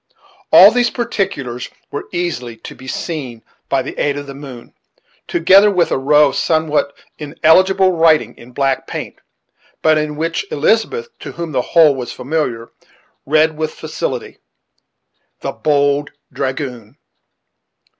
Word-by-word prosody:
All - - +9
these 245 -1 +2
particulars 190 - -3 0.2
were 145 - -5
easily 125 -10 -3
to - - -10
be 130 - -14
seen 130 -7 -5 0.3
by - - +1
the - - -7
aid 145 -1 0
of 145 - -6
the 140 - -9
moon, 135 -4 -11 0.5
together 190 +5 +5
with 180 -4 +1
a - - +1
row 150 +2 +4
of - - -6
somewhat 155 -3 0 0.2
illegible 185 +6 +3
writing 165 -2 +2
in 120 +1 -15
black 135 +1 -1
paint, - - -6 0.7
but 155 -1 +4
in 150 0 -3
which 165 +2 -2
Elizabeth, 225 - 0
to - - -8
whom 170 -2 -5
the 130 - 0
whole 160 +1 +4
was 125 -2 -6
familiar, 125 -5 -3 0.6
read 155 +2 +3
with 155 0 -4
facility, - - -5 1.0
"The - - -3
Bold 145 -1 +1 0.2
Dragoon." 130 -3 -5
150 Hz, 135 wpm, -17 LUFS, 135-165 Hz, 1.0 s, All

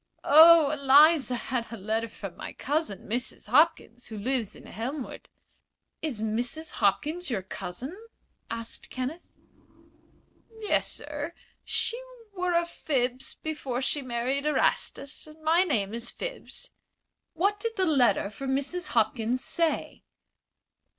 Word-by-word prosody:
"Oh, 315 0 +8
Eliza 285 -1 +5
had 240 -1 -3
a 230 - -5
letter 220 +3 -2
from 195 -4 -8
my - - -7
cousin, 290 -7 -2
Mrs. 240 -1 -2
Hopkins, 260 -3 +3
who 220 - -7
lives 235 0 -1
in - - -13
Elmwood." 255 +5 -6 0.7
"Is 285 -9 -3
Mrs. 245 +9 -2
Hopkins 305 - +1
your 210 -7 -2
cousin?" 215 - -6 0.5
asked 230 0 -5
Kenneth. 260 +7 -4 1.4
"Yes, 425 - +2
sir. 295 +2 -5 0.3
She 475 +2 +1 0.3
were 360 -2 -1
a 340 0 +3
Phibbs 260 -6 -2
before 290 -6 -3
she 290 - 0
married 255 +3 -1
Erastus, 300 -1 0
and 305 +1 -14
my 330 +3 +4
name 220 - 0
is 235 +1 -2
Phibbs." - - -7 0.6
"What 400 +5 +1
did 455 +2 -2
the 375 - +2
letter 245 - +3
from 265 +5 -2
Mrs. 320 +7 -2
Hopkins 225 +3 +1
say?" 335 -2 -1
270 Hz, 125 wpm, -28 LUFS, 235-320 Hz, 1.4 s, Oh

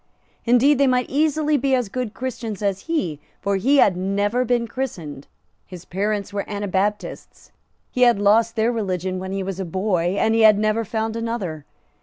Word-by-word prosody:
Indeed 250 +4 +4
they 280 - +4
might 250 -1 +1
easily 300 +1 +2
be 270 0 +1
as 250 -4 -1
good 230 +1 -4
Christians 235 -5 -5
as 195 -1 -1
he; 175 - -1 0.2
for 200 0 0
he 270 +9 +3
had 195 -8 +5
never 200 +6 0
been 240 -1 0
christened; 170 - -6 0.4
his 180 -2 -11
parents 200 +1 -2
were 200 - -2
Anabaptists; 205 0 -3 0.4
he 250 - -3
had 240 -3 +6
lost 220 +3 +3
their 225 +2 +2
religion 185 -5 -2
when 190 0 -6
he 195 0 -2
was 190 0 -5
a - - -1
boy; 185 0 -1
and 220 - +2
he 225 - +3
had 215 -2 +7
never 215 +2 +1
found 220 +1 -3
another. 220 -10 -4
215 Hz, 180 wpm, -22 LUFS, 190-245 Hz, 0.4 s, had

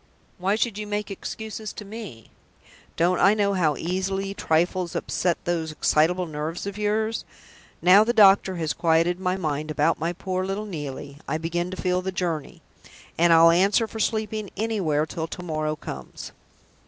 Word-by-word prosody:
Why 195 +3 +1
should 220 -2 -1
you 210 - -5
make 205 0 -3
excuses 220 +1 -6
to 210 - -8
me? 200 - -9 0.7
Don't 175 +2 +2
I 195 +3 +5
know 200 -1 +1
how 160 -6 +1
easily 195 +3 -2
trifles 175 0 0
upset 175 -2 0
those 165 -2 -1
excitable 165 +4 +2
nerves 155 +2 -4
of 200 -1 -5
yours? 215 +2 -1 0.6
Now 190 +4 +8
the 230 - +1
doctor 195 -4 +5
has 160 -3 -1
quieted 170 +2 +2
my 185 0 0
mind 155 -3 -2
about 155 +2 +1
my 165 +2 -1
poor 185 0 -3
little 195 +3 -3
Neelie, 145 -6 -7
I 155 - -1
begin 170 +2 -2
to 185 - -6
feel 180 0 0
the 190 +1 -3
journey; 170 -5 -3 0.5
and 170 +1 +4
I'll 165 0 +7
answer 195 +6 +3
for 220 - -8
sleeping 215 -2 -1
anywhere 190 -9 0
till 160 0 -4
to 180 - -7
morrow 155 -2 -2
comes." 65 - -8
180 Hz, 165 wpm, -25 LUFS, 160-200 Hz, 0.7 s, Now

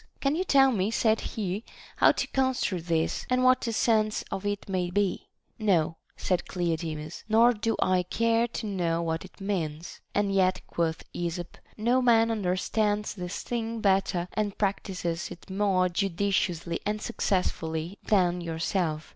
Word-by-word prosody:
Can 275 +2 +1
you 360 - 0
tell 270 -6 +5
me, 200 -3 0
said 225 -1 +2
he, 205 0 -3 0.3
how - - +6
to - - -1
construe 260 -9 0
this, 165 -1 0
and 255 0 +2
what 255 0 +5
the 230 - -2
sense 215 -1 +2
of 195 +1 -3
it 205 -1 -3
may 185 -2 -1
be? 200 +1 0 0.3
No, 170 -7 +2 0.2
said 180 -2 -1
Cleodemus, 160 -3 -3
nor 230 +3 +6
do 225 +1 -1
I 185 -1 +3
care 230 +5 +1
to 235 - -5
know 170 -5 0
what 165 0 -2
it 185 - -16
means. 170 -5 -3
And 200 -1 +1
yet, 185 -1 +2
quoth 165 -1 -2
Esop, 175 0 -4 0.2
no 240 +4 +2
man 230 -2 +4
understands 210 +1 0
this 180 -2 -5
thing 230 -1 -3
better 190 -3 +1
and 210 -2 -1
practises 185 -4 -2
it 175 +2 -11
more 190 -2 +2
judi 195 +2 -1
ciously 170 -3 0
and 210 +1 -1
successfully 180 -5 -2
than 180 -4 +2
yourself. 165 -1 -1
195 Hz, 155 wpm, -28 LUFS, 175-220 Hz, 0.3 s, how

